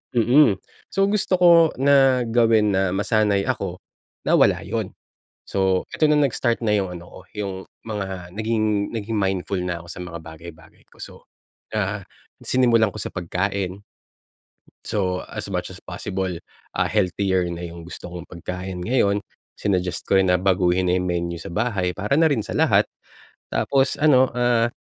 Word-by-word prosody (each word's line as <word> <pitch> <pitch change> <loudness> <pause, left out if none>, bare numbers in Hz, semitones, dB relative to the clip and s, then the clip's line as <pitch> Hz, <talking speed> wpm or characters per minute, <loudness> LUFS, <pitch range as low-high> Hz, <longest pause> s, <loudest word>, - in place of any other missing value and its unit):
Mm. 120 -3 +5 0.3
So, 195 +1 +2
gusto 200 -2 0
ko 180 - +6 0.3
na 135 -3 +4
gawin 115 -3 +3
na 95 -1 +1
masanay 105 +1 +1
ako 100 -8 -2 0.5
na - - +5
wala - - +4
yun. - - -4 0.5
So, 95 -1 +1
eto 155 - +2
na, 150 - +4
nag-start 120 -4 +1
na 110 - +1
yung 95 -3 0
ano 85 - -9
ko, - - -11 0.2
yung 100 -2 -3 0.3
mga 95 -5 -5
naging 110 -1 0
naging 110 0 -3
mindful 95 -1 -1
na 90 -1 -3
ako - - -15
sa - - -9
mga 90 -2 -6
bagay-bagay 80 0 -13
ko. - - -25
So, - - -9 0.6
ah, 100 -2 -2 0.3
sinimulan 120 -4 +3
ko 100 - -8
sa - - -6
pagkain. 95 +2 -3 1.0
So, 90 -3 -1
as - - -5
much - - -3
as - - -10
possible, 95 -3 -4 0.3
ah, - - 0
healthier 95 -2 +1
na 85 - -7
yung 85 0 -10
gusto 90 0 -9
kong 90 -1 -8
pagkain 90 +1 -6
ngayon. 105 -2 +1 0.3
Sinuggest 90 -3 -2
ko 95 - +5
rin 95 - +4
na 90 -1 +2
baguhin 90 -1 +2
na 90 - +3
yung 90 - -2
menu 85 -1 -2
sa 85 +1 -8
bahay 100 -4 0
para 105 +7 0
na 165 - +5
rin 140 -8 +2
sa - - -5
lahat. - - +3 0.6
Tapos 135 -1 +1
ano, 130 -4 +5
ah, 120 -1 +3
100 Hz, 165 wpm, -23 LUFS, 90-115 Hz, 1.0 s, ko